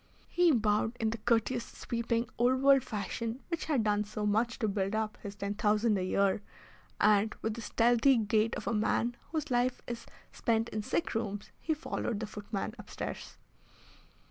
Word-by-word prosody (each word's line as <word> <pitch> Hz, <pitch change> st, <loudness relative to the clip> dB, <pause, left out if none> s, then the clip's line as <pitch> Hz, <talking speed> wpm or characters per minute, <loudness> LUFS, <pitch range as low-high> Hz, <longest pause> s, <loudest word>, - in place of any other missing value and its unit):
He 355 Hz, -1 st, +4 dB
bowed 220 Hz, -1 st, +1 dB
in 220 Hz, -1 st, +1 dB
the 230 Hz, -, -4 dB
courteous, 235 Hz, +2 st, +1 dB
sweeping, 235 Hz, 0 st, -2 dB
old 255 Hz, +2 st, +3 dB
world 275 Hz, -2 st, +6 dB
fashion 225 Hz, +4 st, -4 dB
which 335 Hz, -2 st, -2 dB
had 280 Hz, -8 st, +1 dB
done 210 Hz, -1 st, +2 dB
so 210 Hz, 0 st, -4 dB
much 220 Hz, +3 st, +1 dB
to 220 Hz, -, 0 dB
build 200 Hz, 0 st, -1 dB
up 220 Hz, -1 st, -1 dB
his 200 Hz, 0 st, -7 dB
ten 200 Hz, 0 st, -3 dB
thousand 210 Hz, +1 st, +2 dB
a 190 Hz, -, 0 dB
year, 195 Hz, +2 st, +2 dB, 0.6 s
and, 210 Hz, 0 st, +4 dB
with 220 Hz, -, 0 dB
the 230 Hz, -, -7 dB
stealthy 240 Hz, +4 st, +4 dB
gait 220 Hz, +1 st, +2 dB
of -, -, -6 dB
a -, -, 0 dB
man 230 Hz, +2 st, +1 dB, 0.2 s
whose 315 Hz, -5 st, -2 dB
life 245 Hz, +1 st, +2 dB
is 235 Hz, -1 st, -6 dB, 0.2 s
spent 225 Hz, 0 st, 0 dB
in 215 Hz, -, -3 dB
sick 265 Hz, -, -1 dB
rooms, 205 Hz, -3 st, -3 dB
he 315 Hz, -, -1 dB
followed 240 Hz, -7 st, -3 dB
the 220 Hz, -, -2 dB
footman 210 Hz, 0 st, -4 dB
upstairs. -, -, -6 dB
225 Hz, 175 wpm, -31 LUFS, 210-240 Hz, 0.6 s, world